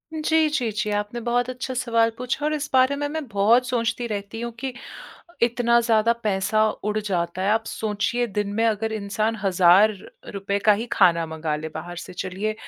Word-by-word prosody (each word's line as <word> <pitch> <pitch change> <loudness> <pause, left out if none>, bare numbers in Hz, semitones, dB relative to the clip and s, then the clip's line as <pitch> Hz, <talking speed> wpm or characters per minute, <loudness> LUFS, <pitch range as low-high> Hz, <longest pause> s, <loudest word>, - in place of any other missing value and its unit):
जी, 315 0 +2
जी, 250 -7 -1
जी। 210 0 -2
आपने 205 +3 -2
बहुत 245 +1 +1
अच्छा 255 +1 -5
सवाल 230 -2 +2
पूछा 250 +4 -3
और 305 - +1
इस 295 -1 -3
बारे 260 +2 +4
में 290 +1 -2
मैं 315 0 -4
बहुत 225 +4 +3
सोचती 235 -1 -1
रहती 205 +1 -5
हूँ 235 0 -4
कि 265 +1 -4 0.7
इतना 235 0 +3
ज़्यादा 230 -1 +3
पैसा 210 +1 +1
उड़ 210 +1 -3
जाता 185 -3 -2
है। 195 - +1
आप 220 +1 +1
सोचिए, 220 +3 -1
दिन 205 -2 -2
में 225 +2 +1
अगर 220 0 0
इंसान 215 +1 -2
1000 190 +2 +5 0.4
रुपए 200 0 -2
का 210 - +8
ही 220 +3 -2
खाना 170 -1 +4
मँगा 160 -1 -3
ले 155 +1 -6
बाहर 175 0 -7
से, - - -8
चलिए 190 +4 -3
220 Hz, 190 wpm, -23 LUFS, 200-245 Hz, 0.7 s, का